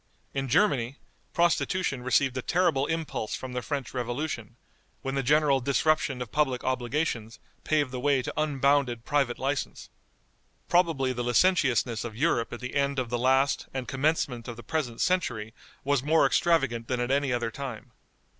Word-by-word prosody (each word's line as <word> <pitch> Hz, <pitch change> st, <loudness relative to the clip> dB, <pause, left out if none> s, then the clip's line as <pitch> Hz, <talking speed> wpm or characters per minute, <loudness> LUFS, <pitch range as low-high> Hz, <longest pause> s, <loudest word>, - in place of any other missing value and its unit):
In 135 Hz, 0 st, -2 dB
Germany, 135 Hz, -, +2 dB, 0.4 s
prostitution 170 Hz, -4 st, +1 dB
received 130 Hz, +1 st, +2 dB
a 130 Hz, -, -2 dB
terrible 165 Hz, -4 st, +1 dB
impulse 160 Hz, -9 st, -3 dB
from 130 Hz, -1 st, -7 dB
the 125 Hz, -, -2 dB
French 140 Hz, -1 st, -4 dB
Revolution, 120 Hz, -2 st, -4 dB, 0.5 s
when 135 Hz, -, -2 dB
the 135 Hz, -, 0 dB
general 140 Hz, 0 st, +3 dB
disruption 140 Hz, -1 st, +1 dB
of 115 Hz, -, -14 dB
public 135 Hz, -4 st, 0 dB
obligations 125 Hz, -3 st, -2 dB, 0.3 s
paved 145 Hz, -4 st, +1 dB
the 130 Hz, -, -4 dB
way 135 Hz, 0 st, +2 dB
to -, -, -4 dB
unbounded 140 Hz, -5 st, +1 dB
private 140 Hz, -4 st, +1 dB
license. 135 Hz, 0 st, -3 dB, 0.8 s
Probably 165 Hz, -7 st, +2 dB
the 120 Hz, 0 st, -3 dB
licentiousness 120 Hz, -, +2 dB
of 115 Hz, -2 st, -6 dB
Europe 120 Hz, -3 st, +1 dB
at 120 Hz, -, -7 dB
the 125 Hz, -, -5 dB
end 140 Hz, -1 st, 0 dB
of 125 Hz, -2 st, -2 dB
the 120 Hz, -, 0 dB
last 130 Hz, +2 st, +2 dB
and 130 Hz, -2 st, -3 dB
commencement 135 Hz, -4 st, -1 dB
of 120 Hz, -, -5 dB
the 120 Hz, -, -10 dB
present 145 Hz, -8 st, -3 dB
century 120 Hz, -13 st, 0 dB, 0.3 s
was 140 Hz, -1 st, +1 dB
more 155 Hz, +4 st, +3 dB
extravagant 135 Hz, -9 st, +2 dB
than 125 Hz, -1 st, -1 dB
at 120 Hz, +1 st, -1 dB
any 140 Hz, -1 st, +1 dB
other 120 Hz, -2 st, -1 dB
time. 125 Hz, -3 st, -7 dB
135 Hz, 165 wpm, -27 LUFS, 120-145 Hz, 0.8 s, general